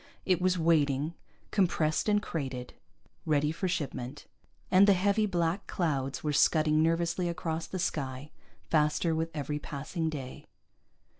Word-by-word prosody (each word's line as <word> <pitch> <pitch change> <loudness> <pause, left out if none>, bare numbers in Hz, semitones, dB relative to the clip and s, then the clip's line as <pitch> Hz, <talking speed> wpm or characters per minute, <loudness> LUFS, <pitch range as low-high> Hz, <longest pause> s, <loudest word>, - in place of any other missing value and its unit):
It 185 -2 +2
was 185 0 +2
waiting, 155 -2 +2 0.4
compressed 170 -3 +1
and 205 0 +2
crated, 130 -6 -4 0.5
ready 150 -1 +1
for 185 +4 -2
shipment, 145 -5 -4 0.5
and 190 +2 +7
the 200 - +7
heavy 200 +3 +2
black 175 0 -1
clouds 140 -6 -1
were 150 -1 0
scudding 155 +1 +4
nervously 170 +2 +1
across 165 -1 -3
the 190 - -5
sky, 145 -5 -3 0.3
faster 155 +1 +1
with 160 +1 -1
every 150 0 -3
passing 155 +3 -3
day. 135 -4 -7
160 Hz, 135 wpm, -30 LUFS, 150-180 Hz, 0.5 s, and